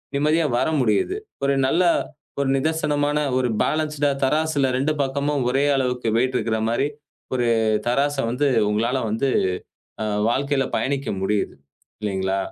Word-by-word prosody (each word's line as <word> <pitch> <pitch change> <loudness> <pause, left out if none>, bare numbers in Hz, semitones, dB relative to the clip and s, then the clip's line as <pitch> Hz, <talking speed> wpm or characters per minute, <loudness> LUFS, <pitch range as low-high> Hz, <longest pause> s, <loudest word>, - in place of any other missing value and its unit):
நிம்மதியா 155 +3 +2
வர - - +1
முடியுது. 110 - +1 0.3
ஒரு 140 0 +3
நல்ல 170 +7 +2 0.6
ஒரு 140 - 0
நிதர்சனமான 150 0 0 0.2
ஒரு 130 -1 +1 0.2
பேலன்ஸ்டா 150 -2 0
தராசுல 150 -1 +1
2 140 +4 +1
பக்கமும் 140 +1 0
ஒரே 135 +2 +2
அளவுக்கு 125 -2 -1
வெயிட் 130 +2 +1
இருக்கிற 110 0 -1
மாதிரி 135 +5 +1 0.5
ஒரு 120 -1 +1 0.4
தராசு 140 +3 +1
வந்து 140 +4 +1 0.2
உங்களால 115 +5 0
வந்து 115 +6 0 0.7
அ - - -1 0.3
வாழ்க்கையில 140 +2 +1
பயணிக்க 140 0 -1 0.2
முடியுது. 105 +1 0 0.5
இல்லீங்களா? 95 -2 -1
135 Hz, 130 wpm, -22 LUFS, 120-145 Hz, 0.7 s, ஒரு